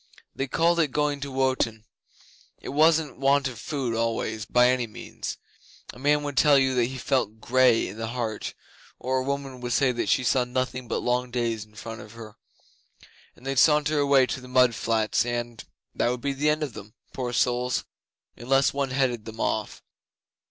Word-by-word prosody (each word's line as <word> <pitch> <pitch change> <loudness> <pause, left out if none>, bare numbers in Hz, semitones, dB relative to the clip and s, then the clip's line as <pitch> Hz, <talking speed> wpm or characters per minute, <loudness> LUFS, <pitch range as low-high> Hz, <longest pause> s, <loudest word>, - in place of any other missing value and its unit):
They 135 - -2
called 170 +6 +2
it 160 - +4
going 145 +1 -1
to 140 0 -6
Wotan. 130 -4 0 0.7
It - - -8
wasn't 155 0 +2
want 140 0 +3
of 120 -4 -7
food 135 -5 -3
always 115 -1 -2
by 125 0 +4
any 125 -2 +1
means. 105 - -7 0.6
A 125 - -13
man 145 +2 +2
would 145 -1 -4
tell 145 +1 +6
you 135 -1 +2
that 125 -2 +2
he 130 +2 -5
felt 120 -4 -1
grey 125 -1 +3
in 100 - -9
the 115 0 -3
heart, 115 -2 -4 0.4
or 130 +1 -1
a - - -2
woman 135 -2 -4
would 120 -1 -2
say 135 -2 +3
that 120 - -2
she 130 - +3
saw 125 +1 +2
nothing 130 0 -3
but - - -2
long 125 0 0
days 115 -3 -2
in 105 0 -25
front 115 +2 -8
of 105 - -12
her; 110 -2 -11 1.0
and 125 - -19
they'd 135 -1 0
saunter 150 +1 +4
away 140 -2 +4
to 130 - -4
the 125 - -11
mud 125 -1 +4
flats 110 -1 +1
and 120 -1 -4 0.3
that - - +1
would 125 0 -3
be 140 +1 -1
the 145 +3 +1
end 155 +1 +1
of 140 -6 -4
them, 105 0 -11 0.2
poor 125 -2 -3
souls, 125 +1 0 0.5
unless 135 +3 +2
one 140 -1 -1
headed 125 -4 0
them 110 0 -9
off. 110 -1 -2
125 Hz, 195 wpm, -26 LUFS, 115-140 Hz, 1.0 s, tell